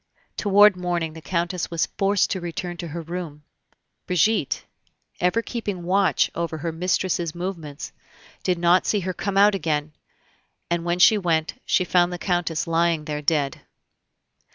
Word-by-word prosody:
Toward 205 -1 +5
morning 175 -3 -2
the 160 - -10
Countess 175 +1 -2
was 170 -2 0
forced 200 0 +1
to 190 - -2
return 175 +1 -5
to 170 - -5
her 165 +2 -6
room. 165 -3 -6 0.6
Brigitte, 180 -2 +1 0.5
ever 180 +6 +1
keeping 205 -8 -4
watch 185 -3 +2
over 170 -1 -3
her 165 +2 -3
mistress's 175 0 -1
movements, 170 -5 -6 0.5
did 180 -1 0
not 175 +2 +3
see 210 - +1
her 185 +1 -3
come 195 +1 -3
out 205 +1 +6
again; 155 -5 -1 0.8
and 170 -1 0
when 175 +1 0
she 210 +4 +6
went, 165 -4 -1
she 185 - +2
found 175 0 +3
the 175 - -4
Countess 175 -3 -1
lying 165 -1 +1
there 150 -1 -3
dead. 145 -2 0
175 Hz, 155 wpm, -23 LUFS, 165-185 Hz, 0.8 s, out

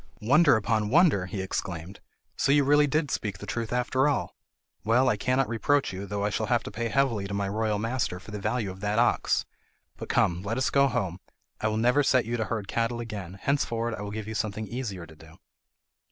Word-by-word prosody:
"Wonder 145 +5 +5
upon 110 -1 0
wonder," 140 - +4
he 95 +1 -4
exclaimed, 95 0 -5 0.4
"so 140 - +1
you 145 0 +5
really 145 +1 +4
did 150 0 0
speak 100 -4 -2
the - - -9
truth 115 -2 -3
after 125 +3 +1
all! 145 - -1 0.5
Well, 120 +5 +3
I 125 - +3
cannot 130 +5 +1
reproach 125 +2 +1
you, 95 +2 -6
though 100 0 -2
I 105 - 0
shall 110 +1 -1
have 120 -1 +1
to - - -7
pay 115 +3 -2
heavily 115 -5 +1
to 100 - -4
my 100 -1 -1
royal 105 +1 0
master 115 -4 -2
for 105 - -12
the 105 - -5
value 105 -1 -1
of 95 - -11
that 105 +1 -1
ox. 120 +1 +2 0.5
But - - -8
come, 85 0 +2
let 105 +5 -3
us 130 - +1
go 140 0 +4
home! 95 -8 -2 0.4
I 110 - 0
will 110 0 -1
never 125 +5 +3
set 130 -3 +3
you 120 +2 -2
to 110 - -1
herd 110 -3 -3
cattle 115 +3 -1
again, 100 -6 -6
henceforward 120 -4 0
I 100 - -6
will 105 - -5
give 105 0 -5
you 110 - -4
something 110 0 -2
easier 105 -8 -5
to 80 0 -15
do." 80 +1 -16
110 Hz, 225 wpm, -27 LUFS, 100-125 Hz, 0.5 s, Wonder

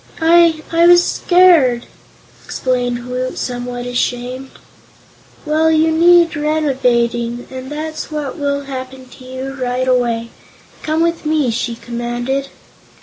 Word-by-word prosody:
"I 330 -1 +4
I 335 +1 +4
was 350 0 +7
scared," 335 -13 +3 0.6
explained 245 -2 -2
Woot, 255 +1 -4
somewhat 245 0 -4
ashamed. 245 +1 -3 1.0
"Well, 310 +1 +2
you 320 0 +3
need 340 +1 +4
renovating, 245 -6 0
and 260 +1 -8
that's 310 +1 -5
what 300 -1 -5
will 280 0 -1
happen 260 -1 -8
to 255 - -15
you, 260 +1 -6
right 255 -1 -2
away. 235 -2 0 0.5
Come 315 +1 0
with 335 0 -1
me!" 300 -5 +1
she 235 0 -3
commanded. 240 +4 -4
265 Hz, 120 wpm, -17 LUFS, 245-310 Hz, 1.0 s, was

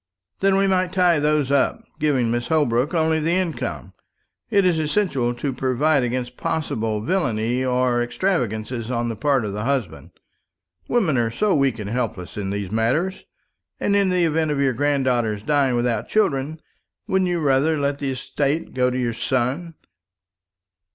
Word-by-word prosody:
"Then 195 0 +3
we 195 - +3
might 185 -2 +1
tie 180 -4 +3
those 150 -2 +1
up, 140 -1 +1 0.2
giving 135 -6 +1
Mrs. 120 0 -1
Holbrook 145 -1 +1
only 160 -1 +2
the 160 +2 0
income. 180 -3 -2 0.6
It 200 -4 +3
is 175 -3 +2
essential 150 -7 0
to 135 +2 -3
provide 135 +4 +1
against 125 0 -3
possible 110 -8 -2
villany 120 - 0
or 125 -1 +1
extravagance 120 - -1 0.2
on 120 -1 -1
the 115 - -3
part 135 +1 +1
of 100 - -4
the 105 +1 -3
husband. 130 - -2 0.8
Women 185 - +2
are 115 -1 +1
so 200 - +1
weak 135 -5 +2
and 105 -3 -5
helpless 115 -7 -3
in 100 -2 -3
these 100 -1 -4
matters. 130 - 0 0.5
And 200 - +1
in 200 -1 +3
the 180 -1 +2
event 160 0 +1
of 145 -2 -1
your 135 -2 +2
granddaughter 130 -5 +1
dying 135 +3 +1
without 120 -1 -1
children, 155 -7 0 0.5
wouldn't 190 -1 +1
you 175 -1 0
rather 145 +2 +2
let 140 0 -1
the 140 - -2
estate 140 +3 -2
go 125 -1 +2
to 125 - -3
your 120 -2 -1
son?" 130 +8 -2
135 Hz, 165 wpm, -22 LUFS, 120-160 Hz, 0.8 s, Then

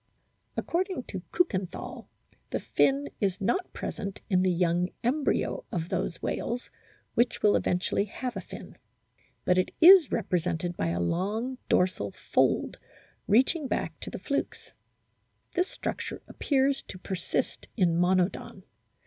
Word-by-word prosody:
According 370 -4 -1
to 190 - -4
Kiikenthal 195 - -1 0.4
the - - -1
fin 275 +1 +2
is 195 -2 0
not 240 - 0
present 200 -1 -5
in 185 -1 +4
the 185 0 +3
young 175 0 +1
embryo 290 - 0
of 170 -1 -2
those 170 - -2
whales 240 +1 -3 0.4
which 240 +1 +1
will 210 - +5
eventually 180 +3 +1
have 245 +4 -5
a - - -3
fin. - - -11 0.7
But 180 0 +4
it 185 - -1
is 355 -2 +9
represented 175 -4 -1
by 85 - -1
a 85 +1 -1
long 210 - -1
dorsal 180 - +1
fold - - +1 0.5
reaching 265 - +3
back - - -2
to - - -5
the - - -6
flukes. - - -3 0.8
This 360 +1 +1
structure - - -5
appears 275 -1 +1
to - - -7
persist 185 0 -3
in 175 -5 +3
Monodon. 180 +2 +1
195 Hz, 130 wpm, -28 LUFS, 180-265 Hz, 0.8 s, is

